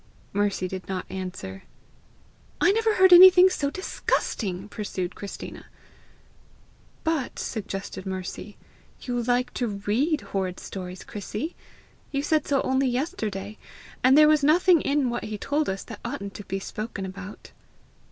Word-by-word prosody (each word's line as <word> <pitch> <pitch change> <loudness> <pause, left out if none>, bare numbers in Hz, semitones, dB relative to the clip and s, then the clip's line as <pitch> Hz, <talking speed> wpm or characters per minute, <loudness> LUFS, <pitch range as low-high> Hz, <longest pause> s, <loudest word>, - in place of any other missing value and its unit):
Mercy 200 -2 0
did 185 0 -7
not 185 -1 -3
answer. 180 - -6 1.0
"I - - +5
never 445 +1 +2
heard 375 -1 +7
anything 370 +1 +9
so 280 -5 -1
disgusting!" 205 - -2
pursued 200 -4 -4
Christina. 200 - -8 1.4
"But," 320 -5 -1
suggested 195 -3 -5
Mercy, 190 +2 -6 0.4
"you 245 -1 -2
like 245 +1 0
to 245 - -1
READ 220 +10 0
horrid 185 -2 -3
stories, 185 -1 -7
Chrissy! 210 - -5 0.5
You 275 0 -2
said 310 0 +1
so 275 -2 +2
only 265 +1 +1
yesterday! 215 - -3 0.4
And 260 +2 +6
there 305 0 +8
was 305 -1 +4
nothing 340 +2 +5
in 280 -3 +1
what 240 - -3
he 215 0 -4
told 290 +7 -1
us 190 +1 -3
that 225 -4 -9
oughtn't 220 -6 -5
to 205 - -9
be 195 - -3
spoken 210 0 -5
about." 190 +2 -9
225 Hz, 140 wpm, -26 LUFS, 195-290 Hz, 1.4 s, anything